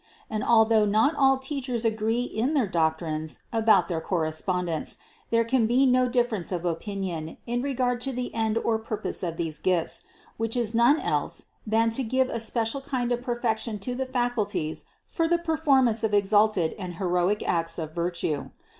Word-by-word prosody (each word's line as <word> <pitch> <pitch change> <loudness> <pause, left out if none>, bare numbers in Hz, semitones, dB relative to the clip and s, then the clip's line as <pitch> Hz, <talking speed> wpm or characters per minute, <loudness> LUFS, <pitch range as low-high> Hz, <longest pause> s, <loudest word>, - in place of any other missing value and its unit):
And 215 -1 -2
although 220 -1 +5
not 215 +8 +3
all 270 -2 +4
teachers 265 -3 -3
agree 225 +2 +1
in 250 +5 -1
their 265 -6 +3
doctrines 160 -3 -1
about 225 -1 +4
their 165 -3 -2
correspon 180 +2 -1
dence, 165 -3 -2 0.3
there 230 0 +3
can 230 -1 +2
be 250 +4 +4
no 255 -1 +3
difference 240 -7 0
of 180 -1 -3
opinion 175 -2 -3
in 240 +1 -1
regard 250 -2 -1
to 270 +2 0
the 250 -1 -4
end 220 -1 0
or 230 -1 +1
purpose 220 -1 -4
of 170 -2 -3
these 160 -3 -3
gifts, 180 -3 0 0.3
which 225 +2 -1
is 235 -2 -1
none 240 +7 +4
else - - -2 0.2
than 225 +1 +2
to 230 - 0
give 260 +2 +1
a 230 - -2
special 225 +3 -1
kind 255 -3 -2
of 245 0 0
perfection 230 -3 -1
to 225 +5 -4
the 260 +1 -3
faculties 240 - -1 0.2
for 330 -1 -1
the 345 +1 +3
performance 285 -9 +2
of 215 -2 +2
exalted 205 -4 +3
and 180 -3 -6
heroic 180 +2 0
acts 165 0 0
of 160 -2 -5
virtue. 170 -4 -2
225 Hz, 175 wpm, -26 LUFS, 180-245 Hz, 0.3 s, although